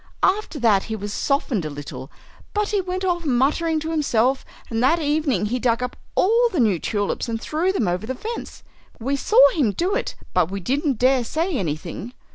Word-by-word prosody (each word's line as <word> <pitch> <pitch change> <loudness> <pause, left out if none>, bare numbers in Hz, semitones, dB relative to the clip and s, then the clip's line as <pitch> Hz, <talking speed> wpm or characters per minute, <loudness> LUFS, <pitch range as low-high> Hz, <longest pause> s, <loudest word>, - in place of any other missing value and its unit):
After 385 -6 +1
that 215 -5 +3
he 220 - -4
was 205 0 -5
softened 275 - 0
a 155 - -3
little, 145 -1 -8 0.5
but 420 0 +1
he 410 -2 +1
went 370 +1 -3
off 350 -2 0
muttering 305 +4 +1
to 320 +1 -3
himself, 265 -4 +1 0.3
and 225 0 0
that 265 +7 +4
evening 290 - +1
he 245 +4 -1
dug 240 0 +1
up 250 - -4 0.2
all 465 +5 +4
the 345 - -1
new 210 -8 +3
tulips 205 +4 -2
and 225 -1 -2
threw 325 +9 0
them 305 - 0
over 180 +5 -2
the 260 - -3
fence. 455 - -6 0.4
We 270 +5 -1
saw 425 - -1
him 280 - +1
do 360 - 0
it, - - -2 0.2
but 180 -2 +2
we 200 +1 -4
didn't 270 - 0
dare 255 +1 +3
say 325 +8 -1
anything." 175 - -4
260 Hz, 200 wpm, -22 LUFS, 220-330 Hz, 0.5 s, that